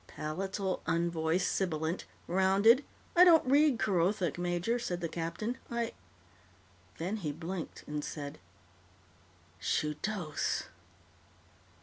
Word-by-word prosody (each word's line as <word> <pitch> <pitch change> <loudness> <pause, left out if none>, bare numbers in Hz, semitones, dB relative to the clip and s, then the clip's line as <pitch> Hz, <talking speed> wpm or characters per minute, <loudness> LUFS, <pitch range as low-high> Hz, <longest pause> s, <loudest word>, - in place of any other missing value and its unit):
Palatal 190 +5 -3
unvoiced 170 +1 +1
sibilant, 165 -2 -1 0.2
rounded 195 +8 +4 0.2
" - - -30
"I 350 - +9
don't 335 -5 +7
read 285 0 +4
Kerothic, 185 -4 +1
major," 175 +7 0
said 175 -7 -3
the 170 - -2
captain. 170 +9 -3
"I 235 -1 -2 0.5
" 90 0 -30
Then 185 +6 -2
he 160 -8 -3
blinked 165 +3 -6
and 150 0 -4
said, 145 - -6 1.2
"_Shudos! 155 +2 -1
175 Hz, 105 wpm, -32 LUFS, 160-210 Hz, 1.2 s, I